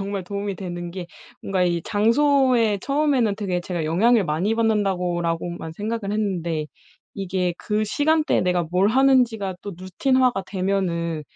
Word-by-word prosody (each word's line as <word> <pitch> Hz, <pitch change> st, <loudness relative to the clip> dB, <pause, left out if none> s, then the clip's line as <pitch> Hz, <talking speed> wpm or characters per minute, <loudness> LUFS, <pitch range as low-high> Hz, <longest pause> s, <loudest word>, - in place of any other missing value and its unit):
정말 195 Hz, -1 st, -4 dB
도움이 200 Hz, 0 st, -4 dB
되는 175 Hz, -2 st, -6 dB
게 180 Hz, 0 st, -6 dB, 0.3 s
뭔가 190 Hz, -2 st, -1 dB
이 175 Hz, -1 st, +1 dB
'장소에 235 Hz, -, +3 dB
처음에는 275 Hz, -6 st, +1 dB
되게 185 Hz, -4 st, -2 dB
제가 175 Hz, -2 st, -4 dB
영향을 205 Hz, +7 st, +3 dB
많이 170 Hz, +8 st, 0 dB
받는다.'고라고만 175 Hz, -6 st, -1 dB
생각을 210 Hz, +1 st, -3 dB
했는데 170 Hz, -7 st, -2 dB, 0.5 s
이게 185 Hz, -2 st, -2 dB
그 215 Hz, -1 st, -1 dB
시간대에 305 Hz, +7 st, +1 dB
내가 180 Hz, -1 st, +1 dB
뭘 190 Hz, +3 st, +3 dB
하는지가 240 Hz, -6 st, +2 dB
또 205 Hz, -, -6 dB
루틴화가 250 Hz, +5 st, +1 dB
되면은 180 Hz, -5 st, -1 dB
195 Hz, 330 characters per minute, -23 LUFS, 175-225 Hz, 0.5 s, 장소에